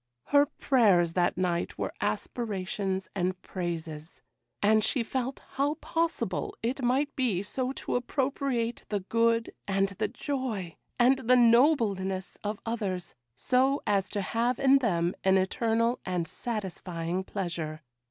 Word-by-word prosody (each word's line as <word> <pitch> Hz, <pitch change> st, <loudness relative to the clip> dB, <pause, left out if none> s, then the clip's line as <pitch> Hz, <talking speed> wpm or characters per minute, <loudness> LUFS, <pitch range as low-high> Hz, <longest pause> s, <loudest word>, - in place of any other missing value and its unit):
Her 285 Hz, 0 st, +5 dB
prayers 205 Hz, -, +3 dB
that 175 Hz, -1 st, +1 dB
night 175 Hz, -2 st, -1 dB
were -, -, -3 dB
aspirations 195 Hz, -4 st, -2 dB
and 185 Hz, -1 st, -1 dB
praises; 165 Hz, -3 st, -5 dB, 0.4 s
and 215 Hz, +1 st, +4 dB
she 250 Hz, +1 st, +1 dB
felt 260 Hz, +3 st, -3 dB
how 280 Hz, +2 st, 0 dB
possible 335 Hz, +5 st, -2 dB
it 255 Hz, +4 st, -1 dB
might 265 Hz, +4 st, +1 dB
be 225 Hz, -8 st, 0 dB
so 255 Hz, +5 st, -2 dB
to -, -, -3 dB
appropriate 250 Hz, -2 st, -1 dB
the 205 Hz, -2 st, -1 dB
good, 230 Hz, +3 st, +1 dB
and 195 Hz, 0 st, +2 dB
the 195 Hz, -, -2 dB
joy, 225 Hz, -, -4 dB, 0.2 s
and 255 Hz, +2 st, +4 dB
the 255 Hz, -, +8 dB
nobleness 230 Hz, -, +3 dB
of 210 Hz, +1 st, -3 dB
others, 200 Hz, -6 st, -3 dB, 0.2 s
so 260 Hz, -, +2 dB
as 200 Hz, -2 st, +1 dB
to 205 Hz, -, -2 dB
have 230 Hz, +5 st, 0 dB
in 275 Hz, 0 st, +5 dB
them 175 Hz, -8 st, +1 dB
an 190 Hz, 0 st, +5 dB
eternal 230 Hz, +5 st, +1 dB
and 180 Hz, -3 st, -2 dB
satisfying 185 Hz, -5 st, -3 dB
pleasure. 165 Hz, -5 st, -4 dB
215 Hz, 135 wpm, -29 LUFS, 185-255 Hz, 0.4 s, the